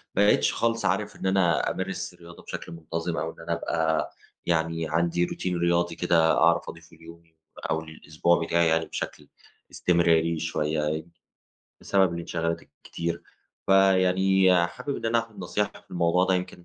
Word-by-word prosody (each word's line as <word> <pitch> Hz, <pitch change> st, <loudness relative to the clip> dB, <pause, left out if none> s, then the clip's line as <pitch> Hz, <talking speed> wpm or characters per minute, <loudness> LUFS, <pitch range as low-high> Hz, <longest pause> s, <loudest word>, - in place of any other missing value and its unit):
بقيتش 105 Hz, +1 st, +4 dB
خالص 115 Hz, 0 st, 0 dB
عارف -, -, 0 dB
إن -, -, -8 dB
أنا 95 Hz, -3 st, +2 dB
أمارس -, -, -4 dB
الرياضة 85 Hz, 0 st, -14 dB
بشكل -, -, -7 dB
منتظم 85 Hz, +1 st, -4 dB
أو 80 Hz, -, -2 dB
إن -, -, -20 dB
أنا 85 Hz, +1 st, -3 dB
أبقى 80 Hz, -2 st, -1 dB, 0.3 s
يعني 80 Hz, -1 st, 0 dB
عندي 85 Hz, +2 st, +1 dB
روتين 90 Hz, 0 st, -3 dB
رياضي 85 Hz, 0 st, +1 dB
كده 85 Hz, -2 st, +3 dB
أعرف 85 Hz, 0 st, +3 dB
أضيفه 85 Hz, 0 st, -13 dB
ليومي 80 Hz, 0 st, -15 dB, 0.3 s
أو 80 Hz, 0 st, 0 dB
للاسبوع 80 Hz, +2 st, -1 dB
بتاعي 85 Hz, 0 st, +2 dB
يعني 80 Hz, 0 st, +2 dB
بشكل -, -, -6 dB, 0.4 s
استمراري 85 Hz, -2 st, +2 dB
شوية، 80 Hz, -1 st, -1 dB
يعني 80 Hz, +2 st, -3 dB, 0.7 s
بسبب 95 Hz, -3 st, +2 dB
الانشغالات 85 Hz, 0 st, -3 dB
الكتير. 85 Hz, 0 st, -6 dB, 0.4 s
فيعني 95 Hz, 0 st, +4 dB
حابب 85 Hz, +11 st, -5 dB
إن -, -, -4 dB
أنا 115 Hz, +1 st, +2 dB
آخد 115 Hz, -2 st, -6 dB
نصيحة 100 Hz, +3 st, -1 dB
في -, -, -33 dB
الموضوع 85 Hz, +1 st, +2 dB
ده، 95 Hz, -, +2 dB
يمكن 90 Hz, -1 st, -4 dB
85 Hz, 150 wpm, -26 LUFS, 80-90 Hz, 0.7 s, بقيتش